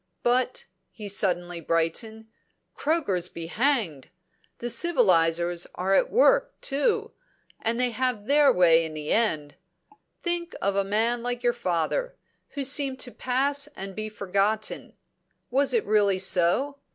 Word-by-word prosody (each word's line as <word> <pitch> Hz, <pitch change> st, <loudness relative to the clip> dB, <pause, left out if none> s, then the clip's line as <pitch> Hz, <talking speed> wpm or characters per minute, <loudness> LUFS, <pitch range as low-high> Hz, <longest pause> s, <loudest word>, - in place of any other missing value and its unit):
But," 250 Hz, +1 st, +1 dB, 0.2 s
he 210 Hz, -2 st, -9 dB
suddenly 175 Hz, -3 st, -2 dB
brightened, 165 Hz, +8 st, -2 dB, 0.5 s
"croakers 205 Hz, -, -1 dB
be 170 Hz, -, -7 dB
hanged! 210 Hz, -, -1 dB, 0.5 s
The 240 Hz, -, -5 dB
civilisers 175 Hz, -, +2 dB
are 190 Hz, +2 st, 0 dB
at -, -, +3 dB
work -, -, +3 dB
too, 290 Hz, -, 0 dB, 0.5 s
and 230 Hz, +2 st, -1 dB
they 250 Hz, -1 st, +2 dB
have 250 Hz, -3 st, -2 dB
their 285 Hz, +2 st, +5 dB
way 165 Hz, -2 st, +4 dB
in 160 Hz, -1 st, -6 dB
the 150 Hz, 0 st, -5 dB
end. 155 Hz, -11 st, 0 dB, 0.7 s
Think 345 Hz, -1 st, -2 dB
of 200 Hz, 0 st, -1 dB
a 200 Hz, -, +2 dB
man 225 Hz, +4 st, 0 dB
like 245 Hz, 0 st, -4 dB
your 240 Hz, 0 st, +2 dB
father, 240 Hz, -, -2 dB, 0.4 s
who 280 Hz, -, -2 dB
seemed 270 Hz, -1 st, +2 dB
to 245 Hz, -, -5 dB
pass 275 Hz, +4 st, -1 dB
and 195 Hz, 0 st, -7 dB
be 215 Hz, 0 st, -4 dB
forgotten. 205 Hz, +1 st, -2 dB, 0.6 s
Was 275 Hz, +2 st, +2 dB
it 460 Hz, -3 st, +1 dB
really 205 Hz, -3 st, +2 dB
so? 190 Hz, +10 st, +1 dB
220 Hz, 140 wpm, -25 LUFS, 180-265 Hz, 0.7 s, their